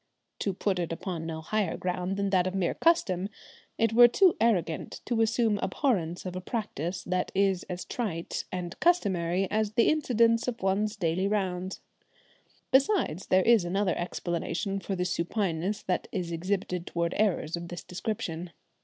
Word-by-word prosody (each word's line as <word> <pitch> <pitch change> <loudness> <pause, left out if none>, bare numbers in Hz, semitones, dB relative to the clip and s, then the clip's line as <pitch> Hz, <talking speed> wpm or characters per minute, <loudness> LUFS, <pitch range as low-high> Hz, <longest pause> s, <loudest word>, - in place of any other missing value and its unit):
To 200 - 0
put 190 0 -1
it 170 -2 -2
upon 165 -1 -4
no 160 -1 -4
higher 200 +1 -1
ground 180 +1 -2
than 200 -1 0
that 185 -1 +3
of 185 - -3
mere 185 -3 +1
custom, 200 - +2 0.5
it 225 0 +2
were 240 +1 +9
too 365 +9 +4
arrogant 185 -8 0
to 235 -2 +1
assume 225 -2 +2
abhorrence 180 - -1
of 180 -1 -5
a 185 - -4
practice 185 - -3
that 185 0 -1
is 195 -2 +2
as 180 0 -4
trite 180 -9 -3
and 180 -1 -5
customary 190 - +2
as 215 0 0
the 230 +1 +4
incidents 235 -6 +3
of 235 -4 -3
one's 205 +3 +1
daily 185 0 0
rounds. 190 -3 -2 0.9
Besides, 265 - +2
there 185 0 +4
is 230 -5 +5
another 185 +1 0
explanation 175 +3 -2
for 195 0 -3
the 180 0 -1
supineness 185 +2 -1
that 180 - -1
is 175 -3 -3
exhibited 180 +1 -2
towards 170 0 -1
errors 180 -6 +1
of 170 0 -6
this 175 0 -7
description. 175 -3 -4
190 Hz, 160 wpm, -28 LUFS, 175-215 Hz, 0.9 s, were